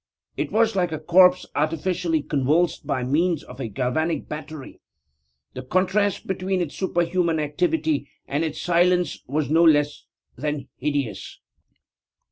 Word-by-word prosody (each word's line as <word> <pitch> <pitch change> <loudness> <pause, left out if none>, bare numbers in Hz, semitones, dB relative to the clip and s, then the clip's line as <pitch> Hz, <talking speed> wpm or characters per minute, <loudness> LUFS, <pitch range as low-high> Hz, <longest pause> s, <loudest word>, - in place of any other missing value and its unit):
It - - -3
was 225 -1 +2
like 180 -3 +1
a 155 - -2
corpse 180 +3 +5
artificially 165 +1 0
convulsed 150 +3 0
by 130 -4 -1
means 160 +5 +1
of 125 +1 -12
a 125 - -3
galvanic 130 - -1
battery. 150 -2 -8 0.7
The 130 - -6
contrast 185 +8 0
between 190 0 -1
its 170 -5 -3
superhuman 175 -2 0
activity 155 -1 0 0.2
and 145 +3 -1
its 155 -2 -3
silence 175 -1 +2
was 145 +2 -1
no 165 +2 +5
less 150 -2 +3 0.3
than 145 0 -4
hideous! 140 -5 -3
160 Hz, 130 wpm, -23 LUFS, 145-180 Hz, 0.7 s, corpse